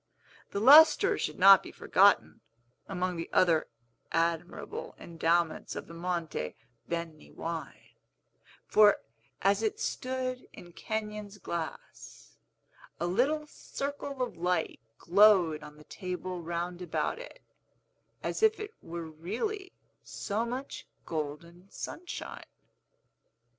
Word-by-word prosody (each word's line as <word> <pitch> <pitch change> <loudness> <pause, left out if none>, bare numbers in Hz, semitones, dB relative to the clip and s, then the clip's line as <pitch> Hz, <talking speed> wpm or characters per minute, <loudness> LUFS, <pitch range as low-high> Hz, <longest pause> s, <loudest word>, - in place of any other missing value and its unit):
The 200 - -3
lustre 295 +8 +8
should - - -3
not 195 +1 +9
be - - -10
forgotten, 200 +1 +3 0.5
among 185 -2 -2
the 165 - -5
other 165 -4 +3 0.4
admirable 165 +1 -2
endowments 165 0 0
of - - -5
the 170 - -12
Monte 170 - -3 0.3
Beni 170 -2 -5
wine; 165 -1 -7 0.7
for, 210 -1 +6 0.5
as 200 +2 +3
it 220 -2 -1
stood 255 0 -3
in 175 -1 -13
Kenyon's 210 -1 -5
glass, 170 -4 -7 0.6
a 170 - -1
little 265 - +1
circle 280 -2 -5
of 245 - -5
light 175 -1 -1 0.2
glowed 180 -4 +5
on 150 0 -12
the 150 - -14
table 180 0 -5
round 175 +1 -4
about 180 - -2
it, - - -11 0.8
as - - -3
if 440 0 +4
it 425 0 -6
were 170 0 -6
really 225 - -4 0.3
so 210 +3 -3
much 260 +3 -6 0.2
golden 170 +4 -6
sunshine. 350 - -7
185 Hz, 110 wpm, -30 LUFS, 170-230 Hz, 0.8 s, not